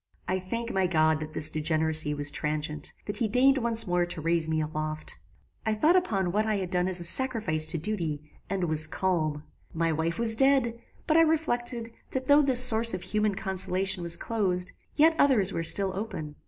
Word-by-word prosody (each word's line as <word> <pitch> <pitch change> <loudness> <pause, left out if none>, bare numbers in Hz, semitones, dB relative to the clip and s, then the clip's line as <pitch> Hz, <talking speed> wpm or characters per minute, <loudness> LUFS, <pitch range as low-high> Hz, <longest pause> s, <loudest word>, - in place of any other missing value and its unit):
"I 185 0 -1
thank 230 +6 -5
my 190 -1 +1
God 155 -2 +1
that 155 0 -8
this 155 - -4
degeneracy 155 -1 +1
was 145 0 -1
transient, 150 0 -4
that 205 - -4
he 230 - 0
deigned 265 +5 +2
once 230 -2 +2
more 175 -1 0
to 175 - -4
raise 165 0 -1
me 160 0 -1
aloft. 155 0 -5 0.4
I 220 -1 -1
thought 310 +11 +2
upon 195 - 0
what 215 +3 -1
I 215 - 0
had 185 -3 -4
done 180 -1 0
as 185 -1 +2
a - - -5
sacrifice 210 -7 +3
to 170 - -1
duty, 155 -5 -4 0.2
and 195 -1 -3
WAS 155 -2 +6
CALM. 155 -6 -2 0.3
My 165 0 0
wife 160 +2 -3
was 230 -1 +2
dead; 260 -2 +1 0.2
but 315 - +1
I - - +6
reflected, 240 -8 -1 0.2
that 260 0 -3
though 285 +2 +5
this 260 -3 +4
source 230 -3 +4
of 185 - -8
human 210 -1 -1
consolation 190 -2 0
was 170 0 +2
closed, 185 -5 -2 0.2
yet 320 +2 +3
others 215 -9 +2
were - - -3
still 190 +4 +3
open. 185 -8 -6
185 Hz, 195 wpm, -26 LUFS, 160-230 Hz, 0.4 s, WAS